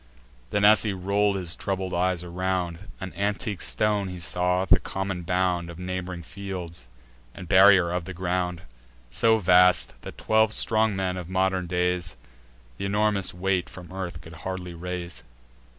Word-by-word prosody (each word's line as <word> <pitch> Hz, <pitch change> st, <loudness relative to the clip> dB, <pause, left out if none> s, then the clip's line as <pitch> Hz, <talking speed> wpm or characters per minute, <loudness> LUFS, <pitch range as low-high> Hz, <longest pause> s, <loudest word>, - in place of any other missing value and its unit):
Then, 100 Hz, +7 st, +2 dB
as 105 Hz, +1 st, +7 dB
he 105 Hz, -3 st, -1 dB
roll'd 100 Hz, +2 st, +1 dB
his 90 Hz, -3 st, -1 dB
troubled 95 Hz, -1 st, -3 dB
eyes 90 Hz, 0 st, 0 dB
around, 90 Hz, -1 st, -2 dB, 0.2 s
An 95 Hz, -2 st, -6 dB
antique 100 Hz, 0 st, -2 dB
stone 105 Hz, -2 st, +1 dB
he 90 Hz, -1 st, -6 dB
saw, 90 Hz, +2 st, 0 dB
the -, -, +5 dB
common 95 Hz, -1 st, -4 dB
bound 90 Hz, -1 st, 0 dB
Of 85 Hz, -, -9 dB
neighb'ring 90 Hz, -1 st, -5 dB
fields, 90 Hz, -7 st, -7 dB, 0.5 s
and 95 Hz, -2 st, -9 dB
barrier 95 Hz, -1 st, +6 dB
of 90 Hz, -1 st, -2 dB
the 95 Hz, -, -6 dB
ground; 90 Hz, -1 st, -2 dB, 0.5 s
So 110 Hz, -, +3 dB
vast, 90 Hz, -2 st, +4 dB
that -, -, -9 dB
twelve 110 Hz, 0 st, +2 dB
strong 110 Hz, -2 st, +2 dB
men 95 Hz, -1 st, -1 dB
of 90 Hz, -1 st, -7 dB
modern 95 Hz, -1 st, 0 dB
days 90 Hz, -1 st, -1 dB, 0.6 s
Th' -, -, -7 dB
enormous 100 Hz, 0 st, +1 dB
weight 90 Hz, 0 st, -1 dB
from 90 Hz, -1 st, -11 dB
earth 90 Hz, -5 st, -5 dB
could 80 Hz, -, -12 dB
hardly 90 Hz, -2 st, -5 dB
raise. 90 Hz, 0 st, -5 dB
90 Hz, 155 wpm, -26 LUFS, 90-95 Hz, 0.6 s, as